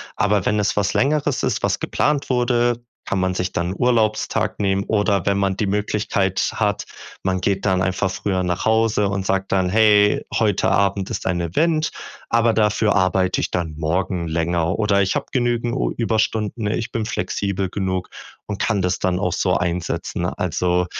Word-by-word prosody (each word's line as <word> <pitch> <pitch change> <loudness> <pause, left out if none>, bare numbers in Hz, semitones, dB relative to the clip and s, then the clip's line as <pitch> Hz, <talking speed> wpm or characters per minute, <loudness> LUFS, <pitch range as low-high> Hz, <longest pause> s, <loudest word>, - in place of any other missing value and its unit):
Aber 105 -2 +1
wenn 105 - +1
es 105 0 0
was 100 0 +1
Längeres 145 0 +1
ist, - - 0
was - - 0
geplant 145 -1 0
wurde, 120 -1 +2 0.3
kann 95 - -1
man 95 0 0
sich 90 0 -2
dann 85 +1 -1
'n - - -5
Urlaubstag 110 -3 +1
nehmen, 100 -1 +1
oder 100 -3 +1
wenn 100 0 +1
man 95 -1 0
die 105 - 0
Möglichkeit 100 -1 0
hat 105 -3 -1 0.4
man 95 -1 0
geht 100 0 0
dann 95 -2 +2
einfach 95 +1 0
früher 95 -1 -1
nach 90 0 -2
Hause 110 -2 +2
und 95 -1 -2
sagt 95 0 -1
dann: 95 -1 +2
„Hey, 105 0 +4
heute 105 -4 +2
Abend 100 -1 +1
ist - - -4
ein 90 -2 0
Event, 155 - +1 0.4
aber 115 0 +3
dafür 105 0 +2
arbeite 95 -1 +2
ich - - -1
dann 85 -3 -2
morgen 85 +2 -1
länger“ 85 +2 0
oder 105 -2 +2
„Ich 95 -1 0
habe - - -1
genügend 120 -2 0 0.2
Überstunden, 110 -1 0
ich 110 +2 -2
bin 110 -1 -2
flexibel 100 -3 -2
genug 95 -1 -2 0.4
und 105 -1 -5
kann 100 -4 0
das 90 -1 0
dann 90 -2 0
auch - - 0
so - - +1
einsetzen." 90 0 -2
Also, 90 0 0
100 Hz, 175 wpm, -21 LUFS, 95-110 Hz, 0.4 s, Hey